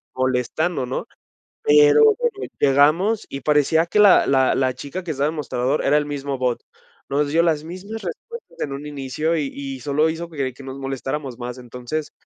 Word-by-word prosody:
molestando, 130 Hz, +4 st, 0 dB
¿no?, 130 Hz, -, -4 dB, 0.6 s
pero 440 Hz, 0 st, +6 dB, 0.4 s
llegamos 155 Hz, +11 st, +3 dB
y 135 Hz, -, -6 dB
parecía 150 Hz, +3 st, +3 dB
que 210 Hz, +5 st, 0 dB
la 205 Hz, -3 st, +6 dB
la 130 Hz, -1 st, +3 dB
la 130 Hz, -1 st, +1 dB
chica 145 Hz, +8 st, -7 dB
que 160 Hz, -, -2 dB
estaba 145 Hz, +1 st, 0 dB
de 160 Hz, -, -5 dB
mostrador 135 Hz, 0 st, -1 dB
era 145 Hz, -, +3 dB
el 150 Hz, -, 0 dB
mismo 140 Hz, -2 st, -4 dB
bot, 125 Hz, -2 st, -1 dB, 0.5 s
nos 145 Hz, +1 st, +1 dB
dio 165 Hz, +3 st, +3 dB
las 155 Hz, -3 st, +1 dB
mismas 190 Hz, +7 st, -7 dB
respuestas 455 Hz, -, -8 dB
en 140 Hz, -, -3 dB
un 140 Hz, +2 st, -7 dB
inicio 150 Hz, +3 st, -2 dB
y 150 Hz, -, -1 dB
y 135 Hz, -1 st, -6 dB
solo 150 Hz, +4 st, +1 dB
hizo 165 Hz, +1 st, -5 dB
que 140 Hz, -5 st, -3 dB
que 135 Hz, -, -13 dB
nos 135 Hz, 0 st, -7 dB
molestáramos 135 Hz, -1 st, -4 dB
más, 125 Hz, 0 st, -5 dB
entonces, 125 Hz, +5 st, -5 dB
145 Hz, 180 wpm, -22 LUFS, 135-165 Hz, 0.6 s, pero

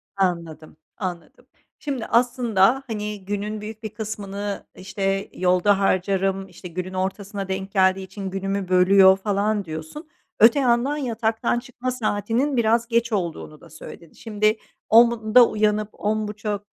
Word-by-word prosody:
Anladım, 170 Hz, -5 st, -3 dB, 0.2 s
anladım. 180 Hz, -3 st, -7 dB, 0.3 s
Şimdi 270 Hz, -6 st, -4 dB
aslında, 240 Hz, 0 st, +2 dB
hani, 210 Hz, -3 st, -5 dB
günün 205 Hz, +1 st, -4 dB
büyük 215 Hz, +1 st, -9 dB
bir 220 Hz, -, -4 dB
kısmını, 205 Hz, -1 st, -5 dB
işte, 195 Hz, +1 st, -3 dB
yolda 185 Hz, +2 st, +2 dB
harcarım, 195 Hz, 0 st, 0 dB
işte, 180 Hz, 0 st, -11 dB
günün 185 Hz, +2 st, -6 dB
ortasına 195 Hz, +1 st, -4 dB
denk 190 Hz, +1 st, -4 dB
geldiği 190 Hz, -1 st, +2 dB
için 190 Hz, +1 st, -7 dB
günümü 195 Hz, 0 st, -3 dB
bölüyor 190 Hz, +1 st, +6 dB
falan 205 Hz, +1 st, -1 dB
diyorsun. 160 Hz, -, -8 dB, 0.3 s
Öte 230 Hz, +6 st, +6 dB
yandan 255 Hz, +2 st, +1 dB
yataktan 230 Hz, -3 st, -1 dB
çıkma 255 Hz, 0 st, -5 dB
saatinin 245 Hz, +3 st, -1 dB
biraz 230 Hz, 0 st, +2 dB
geç 235 Hz, 0 st, 0 dB
olduğunu 170 Hz, -5 st, -4 dB
da 170 Hz, -, -15 dB
söyledin. 160 Hz, +1 st, -12 dB
Şimdi 215 Hz, 0 st, 0 dB, 0.3 s
10.00'da 235 Hz, +1 st, +6 dB
uyanıp 210 Hz, 0 st, 0 dB
10.30'a 210 Hz, -1 st, -2 dB
205 Hz, 130 wpm, -23 LUFS, 190-225 Hz, 0.3 s, bölüyor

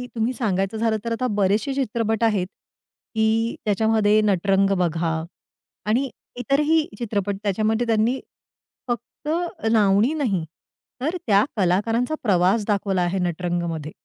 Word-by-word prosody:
तुम्ही 230 Hz, +2 st, 0 dB
सांगायचं 200 Hz, -3 st, -1 dB
झालं 225 Hz, 0 st, +1 dB
तर 230 Hz, -, -2 dB
आता 230 Hz, +3 st, 0 dB
बरेचशे 205 Hz, +4 st, +1 dB
चित्रपट 230 Hz, -4 st, -1 dB
आहेत 205 Hz, -5 st, +2 dB, 0.7 s
की 220 Hz, +1 st, +1 dB
त्याच्यामध्ये 215 Hz, 0 st, +3 dB
नटरंग 195 Hz, -1 st, +2 dB
बघा. 165 Hz, -2 st, 0 dB, 0.6 s
आणि 245 Hz, +6 st, +1 dB, 0.3 s
इतरही 300 Hz, +5 st, +2 dB
चित्रपट 205 Hz, -4 st, -1 dB
त्याच्यामध्ये 220 Hz, +3 st, 0 dB
त्यांनी 230 Hz, +3 st, +2 dB, 0.7 s
फक्त 240 Hz, +4 st, -5 dB, 0.4 s
लावणी 210 Hz, +4 st, +4 dB
नाही 230 Hz, -, 0 dB, 0.6 s
तर 315 Hz, +7 st, -1 dB
त्या 205 Hz, -1 st, +5 dB
कलाकारांचा 220 Hz, -, +1 dB
प्रवास 195 Hz, 0 st, +2 dB
दाखवला 200 Hz, -3 st, 0 dB
आहे 175 Hz, +2 st, 0 dB
नटरंगमध्ये. 170 Hz, -3 st, -2 dB
215 Hz, 115 wpm, -23 LUFS, 195-230 Hz, 0.7 s, त्या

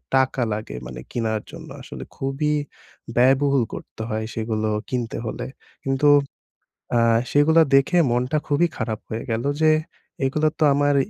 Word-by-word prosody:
টাকা 130 Hz, 0 st, +2 dB
লাগে 110 Hz, +1 st, -5 dB
মানে 65 Hz, -, -8 dB
কেনার 110 Hz, -2 st, -1 dB
জন্য -, -, -10 dB
আসলে -, -, -8 dB
খুবই 135 Hz, +3 st, -1 dB, 0.6 s
ব্যয়বহুল 135 Hz, +1 st, +4 dB
করতে -, -, -8 dB
হয় 110 Hz, 0 st, -2 dB
সেগুলো 110 Hz, -1 st, -1 dB, 0.2 s
কিনতে 120 Hz, -3 st, -2 dB
হলে। 110 Hz, -, -4 dB, 0.4 s
কিন্তু 135 Hz, +2 st, +1 dB, 0.9 s
আ -, -, +4 dB, 0.3 s
সেগুলা 160 Hz, +3 st, +5 dB
দেখে 135 Hz, +6 st, +4 dB
মনটা 125 Hz, +5 st, +1 dB
খুবই 150 Hz, +4 st, +3 dB
খারাপ 110 Hz, -2 st, -3 dB
হয়ে 110 Hz, +1 st, -4 dB
গেলো 115 Hz, +4 st, -1 dB, 0.2 s
যে 155 Hz, -, +6 dB, 0.5 s
এগুলা 150 Hz, +3 st, +1 dB
তো -, -, +3 dB
আমার 145 Hz, 0 st, +2 dB
130 Hz, 140 wpm, -23 LUFS, 115-145 Hz, 0.9 s, যে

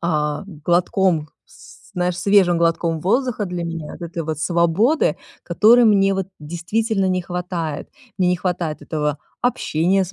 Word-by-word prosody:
а, 150 Hz, -1 st, -1 dB, 0.2 s
глотком, 175 Hz, -2 st, +1 dB, 0.2 s
с -, -, -17 dB
знаешь, 180 Hz, 0 st, -1 dB
свежим 195 Hz, -4 st, +4 dB
глотком 165 Hz, -1 st, 0 dB
воздуха 230 Hz, -, 0 dB
для 175 Hz, -1 st, -4 dB
меня. 165 Hz, -2 st, -6 dB
Вот 170 Hz, -1 st, -6 dB
этой 170 Hz, -1 st, -4 dB
вот 155 Hz, -2 st, -3 dB
свободы, 175 Hz, -, +2 dB, 0.3 s
которой 235 Hz, +3 st, +5 dB
мне 195 Hz, -3 st, +4 dB
вот 190 Hz, -1 st, -2 dB
действительно 190 Hz, +6 st, -1 dB
не 185 Hz, -1 st, 0 dB
хватает. 175 Hz, -3 st, -4 dB, 0.3 s
Мне 180 Hz, -, +3 dB
не 180 Hz, -, +2 dB
хватает 170 Hz, -3 st, -3 dB
этого 150 Hz, -2 st, -2 dB, 0.3 s
общения 190 Hz, -5 st, +1 dB
с 185 Hz, -, -10 dB
175 Hz, 150 wpm, -20 LUFS, 165-195 Hz, 0.3 s, которой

